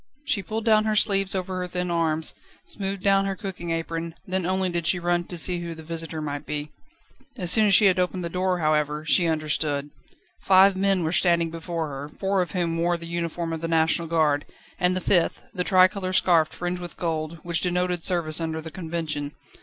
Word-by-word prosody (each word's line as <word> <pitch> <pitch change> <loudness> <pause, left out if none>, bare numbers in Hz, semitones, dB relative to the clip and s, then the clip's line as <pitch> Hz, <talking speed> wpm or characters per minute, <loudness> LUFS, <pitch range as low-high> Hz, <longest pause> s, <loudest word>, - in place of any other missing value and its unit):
She 205 - 0
pulled 220 +3 -4
down 215 -1 +4
her 215 -1 +1
sleeves 195 -2 +2
over 185 0 -3
her 180 0 -3
thin 180 0 -3
arms, 160 -2 +2 0.3
smoothed 195 -1 -3
down 195 -1 +4
her 195 0 -2
cooking 190 -5 -6
apron, 165 0 -3
then 185 -1 -1
only 190 0 +1
did 170 -2 -2
she 180 - +2
run 175 0 0
to 175 - -7
see 175 +1 0
who 170 -1 -5
the 160 - -11
visitor 165 -1 -6
might 145 -1 -4
be. 150 0 -5 0.7
As 180 -2 0
soon 215 +1 +5
as 195 - +6
she 210 - +6
had 185 -2 +4
opened 180 0 -1
the - - -2
door, 185 +1 0
however, 150 -1 0
she 170 +2 +3
understood. 150 -2 -1 0.5
Five 190 +1 +5
men 195 -1 +1
were 160 - -1
standing 170 -2 +3
before 165 -1 -4
her, 140 +1 -6
four 195 +4 -1
of 175 -4 -4
whom 170 -2 -1
wore 175 +1 +1
the 170 - -9
uniform 170 0 -3
of 160 - -4
the 165 - -2
National 165 0 +2
Guard, 155 -3 +1 0.3
and 180 0 +2
the 185 - -2
fifth, 175 -3 +1
the 180 -3 -1
tricolour 185 0 +3
scarf 170 -4 +4
fringed 180 +2 -4
with 175 - -8
gold, 160 -1 -3
which 170 -1 -2
denoted 180 -1 -1
service 170 -3 0
under 160 -1 -2
the 160 0 -8
Convention. 160 -4 -4
175 Hz, 210 wpm, -25 LUFS, 160-185 Hz, 0.7 s, as